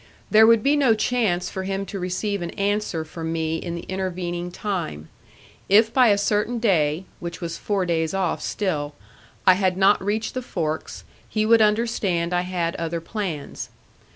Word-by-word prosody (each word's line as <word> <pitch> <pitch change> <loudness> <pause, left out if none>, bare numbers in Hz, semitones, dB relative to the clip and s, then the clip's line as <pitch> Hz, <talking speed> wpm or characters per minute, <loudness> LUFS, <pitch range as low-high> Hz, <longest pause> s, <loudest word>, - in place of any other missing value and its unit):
There 220 +1 +7
would 230 -1 +5
be 285 +2 +4
no 265 -6 +4
chance 215 -5 0
for 190 - -4
him 195 +1 -3
to 195 0 -6
receive 185 +2 -2
an 170 - -3
answer 200 -5 -1
from 160 +1 -5
me 160 0 -1
in 170 0 -5
the 170 - -6
intervening 180 -2 -3
time. 175 - -4 0.6
If 220 +3 +5
by 255 -2 +5
a 205 -2 +4
certain 210 +3 0
day 175 -6 +1
which 170 -1 -6
was 170 -1 -5
four 200 -3 -1
days 160 -2 0
off 185 -3 -1
still 150 -8 -2 0.5
I 185 - +8
had 185 -1 +1
not 195 +1 +4
reached 215 +3 -1
the 255 - -3
forks, 160 -9 -4 0.3
he 215 -1 0
would 225 0 +5
understand 210 -6 +1
I 175 - +2
had 175 -2 -2
other 165 0 -2
plans. 165 -4 -5
190 Hz, 175 wpm, -23 LUFS, 170-210 Hz, 0.6 s, I